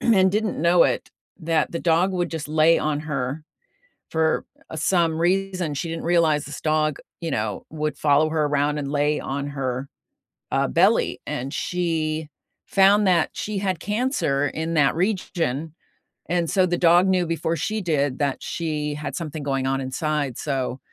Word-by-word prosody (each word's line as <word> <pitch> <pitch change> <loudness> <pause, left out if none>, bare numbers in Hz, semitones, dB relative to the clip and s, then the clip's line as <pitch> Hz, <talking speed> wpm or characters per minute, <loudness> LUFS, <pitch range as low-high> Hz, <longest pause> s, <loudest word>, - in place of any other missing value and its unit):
and 190 -5 +4
didn't 215 -4 -1
know 170 +1 +5
it, - - -1 0.3
that 160 -1 0
the 170 - -2
dog 175 +3 +2
would 175 -1 -1
just 160 -3 -5
lay 155 +2 +4
on 150 -1 -1
her 140 -1 -3 0.7
for, 160 -1 +1 0.3
uh, - - -6
some 165 0 +1
reason 185 -2 0
she 145 +4 -3
didn't 165 0 -5
realize 165 -3 +3
this 145 - -7
dog, 155 -2 +1 0.2
you 165 - -3
know, 105 -2 -2
would 155 -1 -3
follow 150 +1 +3
her 155 -1 +1
around 145 0 +1
and 140 -1 -3
lay 145 +1 +1
on 140 +1 -3
her, 135 -1 -3 0.6
uh, - - +1
belly, 65 - +2
and 130 +3 -4
she 160 -3 -1 0.4
found 200 +1 +4
that 175 -4 +3
she 215 0 -4
had 190 -4 -1
cancer 210 - 0
in 160 +1 -3
that 145 -4 +3
region, 165 - -1 0.6
and 170 -1 0
so 185 -2 +3
the 175 -1 0
dog 175 +2 +5
knew 185 -2 +2
before 165 0 -1
she 215 +8 -2
did 145 -6 0
that 140 -2 -1
she 150 -3 -2
had 150 +1 -5
something 155 -3 -5
going 135 -2 -1
on 135 0 0
inside 140 0 -2
so 135 -3 -2
160 Hz, 170 wpm, -23 LUFS, 145-175 Hz, 0.7 s, know